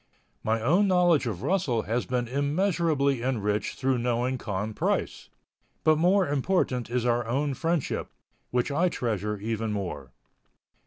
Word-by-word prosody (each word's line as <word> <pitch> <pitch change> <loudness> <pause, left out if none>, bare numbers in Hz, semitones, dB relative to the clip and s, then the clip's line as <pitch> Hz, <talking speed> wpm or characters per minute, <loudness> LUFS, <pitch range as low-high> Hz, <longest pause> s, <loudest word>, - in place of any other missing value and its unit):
My 110 +1 +1
own 180 - +4
knowledge 175 -7 +3
of 105 -4 -4
Russell 145 - +1
has 120 +3 -2
been 125 -1 -1
immeasurably 145 - +1
enriched 105 -5 -1
through 130 -1 +1
knowing 125 +2 0
Con 105 0 -3
Price, - - -2 0.5
but 155 -1 +4
more 185 +2 +4
important 140 -4 0
is 125 0 -1
our 120 -1 +1
own 140 +4 0
friendship, 165 +1 -1 0.4
which 125 +3 0
I 170 +6 +2
treasure 105 - -2
even 110 +1 -2
more. 80 -11 -4
125 Hz, 140 wpm, -27 LUFS, 115-155 Hz, 0.5 s, own